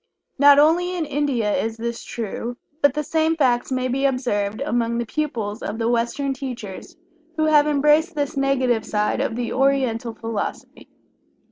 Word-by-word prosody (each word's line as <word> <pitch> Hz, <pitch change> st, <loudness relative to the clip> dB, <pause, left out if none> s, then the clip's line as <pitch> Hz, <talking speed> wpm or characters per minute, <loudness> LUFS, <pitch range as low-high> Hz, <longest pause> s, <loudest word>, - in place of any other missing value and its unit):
Not 285 Hz, 0 st, +7 dB
only 350 Hz, +5 st, +3 dB
in 330 Hz, -, -1 dB
India 275 Hz, -7 st, 0 dB
is 225 Hz, 0 st, -2 dB
this 235 Hz, +1 st, -4 dB
true, 235 Hz, +2 st, -5 dB, 0.2 s
but 285 Hz, -1 st, +4 dB
the 300 Hz, -, -1 dB
same 320 Hz, +2 st, +1 dB
facts 255 Hz, -5 st, +1 dB
may 255 Hz, 0 st, 0 dB
be 270 Hz, +2 st, 0 dB
observed 215 Hz, -6 st, -1 dB
among 235 Hz, -4 st, 0 dB
the 235 Hz, -, -1 dB
pupils 230 Hz, -6 st, -3 dB
of 210 Hz, -, -4 dB
the 230 Hz, 0 st, 0 dB
Western 240 Hz, +4 st, 0 dB
teachers 250 Hz, -8 st, -7 dB, 0.4 s
who 310 Hz, -, +2 dB
have 300 Hz, -1 st, +5 dB
embraced 300 Hz, +3 st, +3 dB
this 290 Hz, -1 st, -2 dB
negative 260 Hz, -4 st, +1 dB
side 210 Hz, -1 st, -1 dB
of -, -, -1 dB
the 240 Hz, 0 st, -3 dB
Oriental 255 Hz, -4 st, +1 dB
Philosophy. 225 Hz, -2 st, -5 dB
255 Hz, 160 wpm, -22 LUFS, 230-290 Hz, 0.4 s, Not